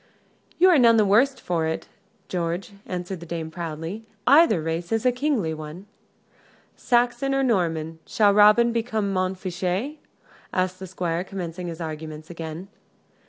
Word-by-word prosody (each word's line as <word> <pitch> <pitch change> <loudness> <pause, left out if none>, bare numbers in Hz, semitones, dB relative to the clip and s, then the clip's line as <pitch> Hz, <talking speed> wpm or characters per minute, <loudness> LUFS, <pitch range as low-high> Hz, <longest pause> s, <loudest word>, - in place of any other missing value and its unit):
"You 370 +2 +6
are 325 - +5
none 230 -2 +6
the 215 - +4
worse 240 +8 +4
for't, 160 -8 -2 0.4
George," 175 +2 -3 0.2
answered 180 0 -4
the 170 - -9
dame, 160 -1 -4
proudly. 165 +5 -5 0.2
"Either 290 - +6
race 165 +3 -3
is 225 +1 0
a 250 - +5
kingly 245 - 0
one." 155 +4 -8 0.9
"Saxon 245 +3 +1
or 270 - +2
Norman 165 -8 0
shall 205 -2 +3
Robin 210 +3 +6
become 220 -4 -1
Montfichet?" 185 - -2 0.5
asked 185 0 -1
the 190 - -7
Squire, 175 -1 -2
commencing 180 -2 -6
his 165 -1 -6
arguments 155 0 -7
again. 165 +2 -7
185 Hz, 140 wpm, -24 LUFS, 165-225 Hz, 0.9 s, You